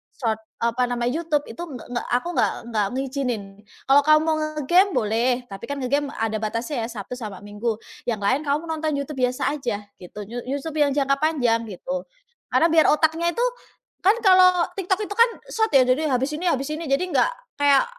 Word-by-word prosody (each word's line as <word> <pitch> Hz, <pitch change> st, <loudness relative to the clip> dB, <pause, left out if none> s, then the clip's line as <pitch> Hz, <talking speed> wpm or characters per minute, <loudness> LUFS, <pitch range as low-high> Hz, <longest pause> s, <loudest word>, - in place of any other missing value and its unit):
Short 225 Hz, -5 st, -1 dB, 0.2 s
eee, 235 Hz, -, +3 dB
apa 250 Hz, +2 st, 0 dB
namanya, 240 Hz, 0 st, 0 dB
YouTube 310 Hz, -2 st, 0 dB
itu -, -, -10 dB
nggak 275 Hz, -9 st, -8 dB
nggak 240 Hz, -, -3 dB
aku 245 Hz, +7 st, +1 dB
nggak -, -, +2 dB, 0.2 s
nggak 210 Hz, -2 st, +2 dB
ngizinin. 260 Hz, -4 st, -2 dB, 0.5 s
"Kalau 280 Hz, +1 st, +7 dB
kamu 305 Hz, 0 st, +6 dB
mau 320 Hz, 0 st, +1 dB
nge-game 310 Hz, +5 st, +2 dB
boleh, 230 Hz, +1 st, +1 dB, 0.2 s
tapi 195 Hz, 0 st, -8 dB
kan 285 Hz, -, -3 dB
nge-game 280 Hz, +3 st, 0 dB
ada 220 Hz, -1 st, -1 dB
batasnya 230 Hz, +3 st, -2 dB
ya, -, -, -5 dB
Sabtu 215 Hz, +1 st, -7 dB
sama 210 Hz, -5 st, -7 dB
Minggu. 210 Hz, +2 st, -3 dB, 0.3 s
Yang 220 Hz, -3 st, -2 dB
lain 260 Hz, +7 st, +2 dB
kamu 290 Hz, +2 st, 0 dB
nonton 315 Hz, -1 st, -1 dB
YouTube 280 Hz, 0 st, -5 dB
biasa 250 Hz, +2 st, +1 dB
aja," 210 Hz, -7 st, -2 dB, 0.2 s
gitu. 180 Hz, +3 st, -10 dB
you 240 Hz, +1 st, -4 dB
YouTube 285 Hz, +4 st, -4 dB
yang 285 Hz, -1 st, +4 dB
jangka 275 Hz, -1 st, +2 dB
panjang, 245 Hz, -8 st, +2 dB
gitu. 270 Hz, +9 st, -4 dB, 0.5 s
Karena 330 Hz, -, +4 dB
biar 320 Hz, -1 st, +5 dB
otaknya 320 Hz, +2 st, +2 dB
itu 480 Hz, -, +1 dB, 0.6 s
kan 395 Hz, +4 st, +5 dB
kalau 370 Hz, -3 st, +6 dB
TikTok 380 Hz, +2 st, 0 dB
itu -, -, -5 dB
kan 470 Hz, +1 st, +6 dB, 0.2 s
Short 440 Hz, -1 st, +1 dB
ya, 270 Hz, -2 st, +7 dB
jadi 255 Hz, +5 st, +2 dB
habis 260 Hz, +3 st, 0 dB
ini, 340 Hz, +4 st, -5 dB
habis 275 Hz, -1 st, -1 dB
ini, 325 Hz, -, -6 dB
jadi 275 Hz, +6 st, +2 dB
nggak -, -, +2 dB, 0.3 s
kayak 285 Hz, -1 st, +5 dB
275 Hz, 195 wpm, -23 LUFS, 240-315 Hz, 0.6 s, Kalau